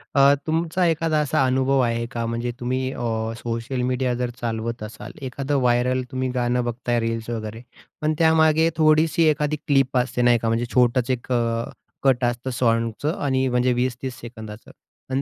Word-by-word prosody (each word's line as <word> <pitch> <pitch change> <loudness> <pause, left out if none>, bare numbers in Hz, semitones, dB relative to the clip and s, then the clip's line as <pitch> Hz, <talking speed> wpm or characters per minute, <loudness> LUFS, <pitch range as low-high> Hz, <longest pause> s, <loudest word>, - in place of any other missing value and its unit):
अ, 140 0 +6
तुमचा 165 +3 0
एखादा 160 -1 +1
असा 135 -2 +1
अनुभव 130 +1 +2
आहे 115 -2 +1
का? 115 -3 -3
म्हणजे 115 +1 -2
तुम्ही 130 +1 -1
अ, - - -8 0.4
सोशल 120 +2 -3
मीडिया 125 0 0
जर 125 - 0
चालवत 115 0 -3
असाल, 105 +1 -8
एखादं 135 +2 -3
व्हायरल 125 +1 +2
तुम्ही 130 -1 -2
गाणं 125 0 +1
बघताय 120 0 -1
रील्स 115 0 -3
वगैरे 110 -1 -5 0.4
पण 155 +1 +1
त्यामागे 160 0 +4
थोडीशी 155 +1 +4
एखादी 150 0 0
क्लिप 135 -2 +2
असते 125 0 0
नाही 120 -1 +5
का, 115 - -2
म्हणजे 115 +1 +1
छोटंच 125 0 +3
एक 125 0 -4
अ, 115 -1 +1 0.4
कट 130 -2 +3
असतं 120 +1 -2
साँगचं 115 +4 0
आणि 130 -2 +1
म्हणजे 125 0 +2
20-30 125 0 -3
सेकंदांचं 110 -2 -10 0.4
अन् 135 - +1
125 Hz, 165 wpm, -23 LUFS, 120-135 Hz, 0.4 s, अ